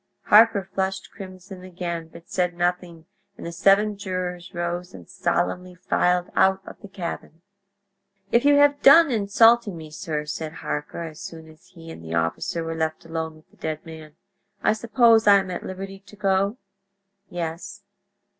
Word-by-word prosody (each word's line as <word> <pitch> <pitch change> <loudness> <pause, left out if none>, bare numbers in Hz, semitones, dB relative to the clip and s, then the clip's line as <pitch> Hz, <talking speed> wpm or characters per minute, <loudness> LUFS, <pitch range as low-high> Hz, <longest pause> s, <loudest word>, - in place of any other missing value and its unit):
Harker 215 -1 +5
flushed 190 0 -3
crimson 185 -1 -11
again, 170 -2 -5
but 170 +2 -14
said 180 -3 -1
nothing, 175 -2 -2 0.3
and - - -9
the 170 - -5
seven 200 +4 +3
jurors 180 -2 -4
rose 175 0 -4
and - - -12
solemnly 180 +1 -2
filed 180 0 0
out 190 0 +4
of - - -11
the 205 - -10
cabin. 175 -3 -7 0.9
"If 235 - +3
you 290 0 +5
have 285 0 +4
done 290 +2 +7
insulting 225 -1 +3
me, 155 -1 -10
sir," 150 -1 -4
said 155 +1 -5
Harker, 150 +2 -5
as 155 -1 -9
soon 160 -1 -9
as 155 0 -18
he 165 -2 -12
and 85 - -11
the 80 0 -5
officer 80 - -1
were 165 0 -4
left 160 -1 -3
alone 160 -1 -4
with 155 - -22
the - - -25
dead 155 0 -5
man, 160 -2 -11 0.5
"I - - +4
suppose 225 0 +3
I 200 - +8
am 195 -2 +1
at 180 - -4
liberty 195 +1 -7
to 200 +2 -17
go?" 195 +2 0 0.7
"Yes." 175 +4 -6
180 Hz, 165 wpm, -24 LUFS, 165-200 Hz, 0.9 s, I